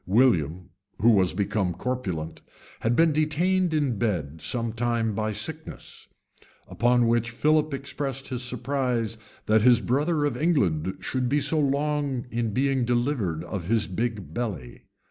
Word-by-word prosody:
William, 90 - +2 0.3
who 120 +3 +5
was 95 -5 +4
become 100 -1 -1
corpulent, 95 -11 -4 0.4
had 115 +2 +1
been 165 +2 +4
detained 165 +4 +1
in 145 -9 0
bed 80 -9 -2
some 115 +7 -2
time 115 -1 0
by 110 +1 -1
sickness; 105 - -7 0.6
upon 120 0 +2
which 115 0 +1
Philip 155 +5 +2
expressed 135 0 -4
his 125 -2 -3
surprise 125 -3 -1 0.3
that 110 0 +4
his 120 0 +6
brother 145 +6 +1
of 145 -4 -1
England 100 - +1
should 125 -2 -1
be 145 +3 +2
so 150 +3 +1
long 140 -2 0
in 115 -1 -1
being 135 +3 +1
delivered 120 - 0
of 85 -1 -5
his 110 -1 +2
big 105 +3 -3
belly. 90 - -5
120 Hz, 145 wpm, -26 LUFS, 105-140 Hz, 0.6 s, his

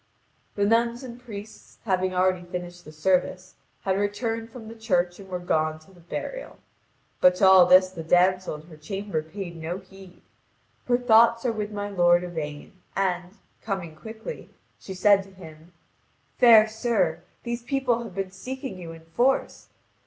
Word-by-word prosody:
The 205 - +1
nuns 235 +3 +1
and 245 -1 -9
priests, 215 -3 -11
having 185 -2 +1
already 185 0 +1
finished 175 0 -7
the 155 - -10
service, 185 +3 0 0.3
had 190 0 0
returned 225 +3 -2
from 230 -1 -11
the 225 - -8
church 180 -6 0
and 195 -1 -12
were 180 - -3
gone 155 -3 0
to 155 +5 -20
the 175 - -19
burial. - - -6 0.6
But 180 0 +5
to 190 - +3
all 190 -2 +8
this 185 +1 +6
the 175 -3 -7
damsel 180 +1 +2
in 150 - -10
her 160 -1 -14
chamber 195 +1 -4
paid 170 +2 -8
no 165 +3 -4
heed. 190 -1 -15 0.6
Her 245 -1 +3
thoughts 235 0 +4
are 245 - +2
with 210 -2 -3
my 205 -1 -4
lord 175 -3 +3
Yvain, 155 -4 -6 0.2
and, 185 0 -2 0.2
coming 190 -7 -4
quickly, 220 - -9 0.3
she 190 - -8
said 200 +1 +5
to 195 - -14
him: 160 -2 -13 0.7
"Fair 225 -3 +8
sir, 215 -7 0 0.2
these 235 0 -3
people 250 -2 0
have 225 -6 -9
been 195 -1 -3
seeking 255 +1 -7
you 170 -2 -8
in 165 0 -14
force. 245 +11 0
190 Hz, 165 wpm, -25 LUFS, 175-220 Hz, 0.7 s, all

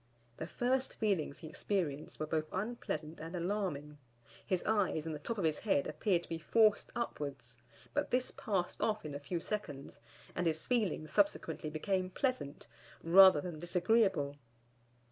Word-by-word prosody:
The 160 - -4
first 255 +6 0
feelings 190 -10 0
he 160 - -7
experienced 155 -4 -2
were 155 - -1
both 155 0 -1
unpleasant 185 -7 -3
and 165 +3 -6
alarming; 170 -6 -2 0.4
his 185 -2 -1
eyes 200 -7 +1
and 160 - -3
the 150 - -5
top 225 +10 -4
of 195 - -1
his 155 -2 +1
head 195 -10 +2
appeared 180 -5 +1
to - - -13
be 165 - -3
forced 215 +5 +3
upwards, 140 - -4 0.3
but - - 0
this 250 +1 +1
passed 190 -4 -2
off 215 -5 0
in 150 - -5
a 140 - -4
few 170 +5 -3
seconds, 165 -8 -5 0.3
and 175 -1 0
his 160 -1 -1
feelings 205 -10 0
subsequently 300 - +1
became 185 +4 -1
pleasant, 255 - -2 0.4
rather 185 -2 +8
than 170 -2 -6
disagreeable. 175 -4 +2
175 Hz, 160 wpm, -34 LUFS, 155-210 Hz, 0.4 s, rather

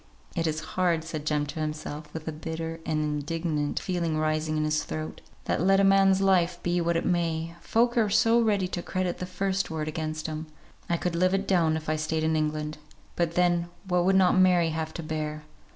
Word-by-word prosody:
"It 165 -2 0
is 155 0 -1
hard," 175 -3 +1
said 155 -2 -5
Jem 150 -1 +1
to 145 +3 -6
himself, 150 -1 -5
with 160 0 -7
a - - -1
bitter 160 +1 -5
and 155 -1 0
indignant 150 0 -1
feeling 170 -4 -1
rising 155 0 0
in 155 - +1
his 155 0 +1
throat, 155 0 -5 0.2
"that - - 0
let 195 +2 +4
a - - +4
man's 195 0 +5
life 180 -3 +3
be 175 0 +1
what 170 0 +1
it - - -2
may, 165 -2 0
folk 235 +1 +2
are 215 -2 +2
so 230 +3 +4
ready 205 -4 +2
to 175 - -3
credit 185 0 -2
the 180 - -4
first 195 +1 -1
word 155 -2 -3
against 155 0 -3
him. 155 0 -4 0.4
I 170 - +2
could 175 0 -2
live 185 +2 +3
it 195 0 -2
down 165 -4 +3
if 155 - -8
I 155 0 +1
stayed 155 +1 -1
in 160 0 +2
England; 155 0 -2 0.4
but 170 -1 0
then 175 -1 +2 0.2
what 180 -1 +2
would 190 +1 +4
not 190 -1 +5
Mary 180 -3 +4
have 160 0 -3
to 170 - -5
bear? 155 -1 -4
165 Hz, 215 wpm, -27 LUFS, 155-180 Hz, 0.4 s, man's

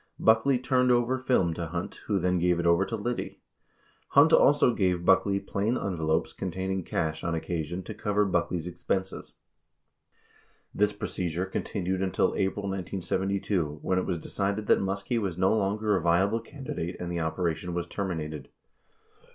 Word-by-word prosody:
Buckley 115 +4 +4
turned 125 0 +2
over 120 +2 +2
film 125 -10 +2
to 85 0 -4
Hunt, 85 +2 -5
who 105 - +1
then 90 0 +1
gave 90 0 +2
it 85 - -1
over 85 +3 +4
to 115 - -3
Liddy. 120 +3 -4 0.7
Hunt 145 +4 +5
also 145 -4 +5
gave 90 -4 0
Buckley 100 +1 +4
plain 105 +5 -1
envelopes 80 -4 -1
containing 95 +1 -3
cash 80 -1 -2
on 85 -1 -1
occasion 85 +2 -3
to - - -7
cover 105 0 +1
Buckley's 90 -2 -1
expenses. 90 +2 -3 1.4
This 105 0 +2
procedure 90 -3 -3
continued 95 -1 -2
until 95 -2 +1
April 95 +1 -1
1972, 95 -3 -2
when 95 0 +1
it - - -3
was 90 - -1
decided 100 +5 -2
that - - +4
Muskie 100 +5 -1
was 95 -5 -3
no 95 +3 +3
longer 105 0 +1
a 95 - 0
viable 95 +6 +2
can 135 +5 -11
didate 85 -5 -4
and 90 0 -4
the 85 - -2
operation 85 +1 -2
was 85 -1 -1
terminated. 80 -6 -4
95 Hz, 160 wpm, -28 LUFS, 85-105 Hz, 1.4 s, Hunt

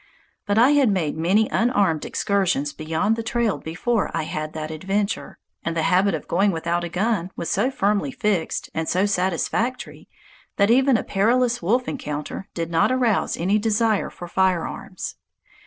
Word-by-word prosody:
But 205 +1 +1
I 245 +5 +6
had 285 -5 +4
made 175 -7 0
many 190 +7 +2
unarmed 200 -10 +1
excursions 185 -8 0
beyond 160 +8 0
the 230 - -3
trail 235 -2 0
before 200 +7 -1
I 165 - -1
had 155 0 -4
that 155 0 -5
adventure, 195 +6 -2 0.3
and 165 0 -2
the 160 - +1
habit 190 0 +3
of 155 - -7
going 195 +4 +2
without 170 0 -1
a 170 - -4
gun 185 0 0
was 170 - -4
so 215 +7 +2
firmly 210 -1 0
fixed 210 -8 -1
and 160 0 -2
so 185 +3 +2
satisfactory 200 +6 -2 0.5
that 200 +2 +4
even 260 0 +4
a - - -3
perilous 240 +4 +1
wolf 245 +9 +1
encounter 150 - -5
did 170 -1 -3
not 165 +8 +3
arouse 245 -5 +1
any 195 +5 +1
desire 220 -1 +1
for 175 - -9
firearms. 185 -1 -2
195 Hz, 165 wpm, -23 LUFS, 170-225 Hz, 0.5 s, I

